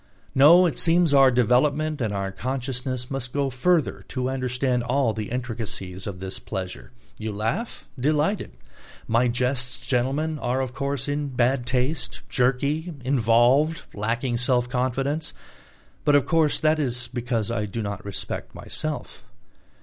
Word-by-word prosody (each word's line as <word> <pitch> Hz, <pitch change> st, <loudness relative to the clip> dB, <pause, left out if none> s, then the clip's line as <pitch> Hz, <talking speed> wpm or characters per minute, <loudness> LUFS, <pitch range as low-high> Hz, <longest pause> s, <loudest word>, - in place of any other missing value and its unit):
No, 165 Hz, +7 st, +7 dB
it 170 Hz, -, -1 dB
seems 170 Hz, -2 st, +3 dB
our 135 Hz, -1 st, +7 dB
development 135 Hz, +5 st, +2 dB
and 110 Hz, -3 st, 0 dB
our 100 Hz, -1 st, -2 dB
consciousness 125 Hz, +3 st, -3 dB
must 130 Hz, -2 st, -3 dB
go 140 Hz, -2 st, +1 dB
further 155 Hz, +6 st, +1 dB
to 130 Hz, 0 st, -2 dB
understand 125 Hz, -1 st, 0 dB
all 125 Hz, -1 st, +1 dB
the 105 Hz, -1 st, -4 dB
intricacies 110 Hz, -6 st, -4 dB
of 100 Hz, -3 st, -5 dB
this 95 Hz, 0 st, -5 dB
pleasure. 90 Hz, -11 st, -6 dB, 0.3 s
You 110 Hz, 0 st, -3 dB
laugh? 115 Hz, -, -3 dB
Delighted. 150 Hz, -, 0 dB, 0.5 s
My 115 Hz, +2 st, +3 dB
jests, 125 Hz, +1 st, 0 dB
gentlemen, 140 Hz, +5 st, 0 dB
are 125 Hz, 0 st, 0 dB
of 130 Hz, -2 st, -2 dB
course 140 Hz, 0 st, -2 dB
in 145 Hz, 0 st, -1 dB
bad 125 Hz, -1 st, +1 dB
taste, 125 Hz, +3 st, -1 dB
jerky, 140 Hz, +7 st, +1 dB
involved, 130 Hz, +5 st, +3 dB
lacking 120 Hz, +4 st, -1 dB
self 125 Hz, 0 st, +1 dB
confidence. 135 Hz, +5 st, -1 dB, 0.7 s
But 145 Hz, -, +4 dB
of 145 Hz, -, +4 dB
course 160 Hz, -3 st, +2 dB
that 155 Hz, 0 st, +2 dB
is 125 Hz, -4 st, -1 dB
because 120 Hz, -3 st, -2 dB
I 105 Hz, -2 st, -1 dB
do 110 Hz, +3 st, -4 dB
not 100 Hz, -2 st, -4 dB
respect 100 Hz, -1 st, -5 dB
myself. -, -, -5 dB
125 Hz, 140 wpm, -25 LUFS, 120-140 Hz, 0.7 s, No